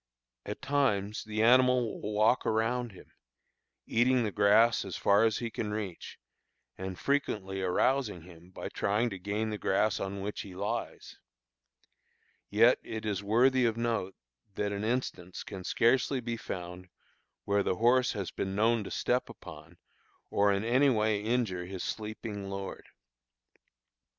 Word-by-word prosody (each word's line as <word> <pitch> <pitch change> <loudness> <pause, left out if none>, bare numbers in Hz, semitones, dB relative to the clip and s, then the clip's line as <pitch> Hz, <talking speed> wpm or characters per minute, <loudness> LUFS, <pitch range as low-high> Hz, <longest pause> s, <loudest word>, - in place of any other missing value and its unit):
At - - -6
times 110 -8 0
the 110 0 -1
animal 125 -1 +4
will 105 - -4
walk 110 +4 +3
around 115 +2 0
him, 95 - -16 0.7
eating 125 +2 +2
the 105 - -1
grass 105 +4 +4
as 95 -3 -6
far 100 +2 +4
as 110 -2 +1
he 115 -1 -4
can 105 0 -3
reach, 105 -5 -5 0.6
and 95 -1 -6
frequently 105 -9 -1
arousing 105 +1 +1
him 85 0 -15
by 95 - -7
trying 110 +4 0
to 100 - -6
gain 105 +3 -2
the 105 - -4
grass 105 +2 +1
on 100 0 -4
which 105 +2 -4
he 95 -2 -10
lies; 95 - -4 1.3
yet 115 +4 +5
it 110 -1 -6
is 100 -3 -1
worthy 125 +5 +3
of 115 -1 0
note, 115 -5 -1 0.4
that 105 0 -1
an 100 0 -3
instance 110 -7 -3
can 95 -3 -8
scarcely 130 +6 +2
be 120 -1 -3
found 90 -3 -7 0.6
where 100 0 +2
the 95 - 0
horse 120 +4 +3
has 100 -5 -4
been 95 0 -3
known 115 +1 +2
to - - -7
step 125 +1 0
upon 80 +3 -12 0.5
or 100 0 +3
in 100 +1 0
anywise 115 -5 +2
injure 110 -6 -1
his 95 -1 -6
sleeping 105 -2 -5
lord. 95 0 -6
105 Hz, 150 wpm, -30 LUFS, 95-120 Hz, 1.3 s, yet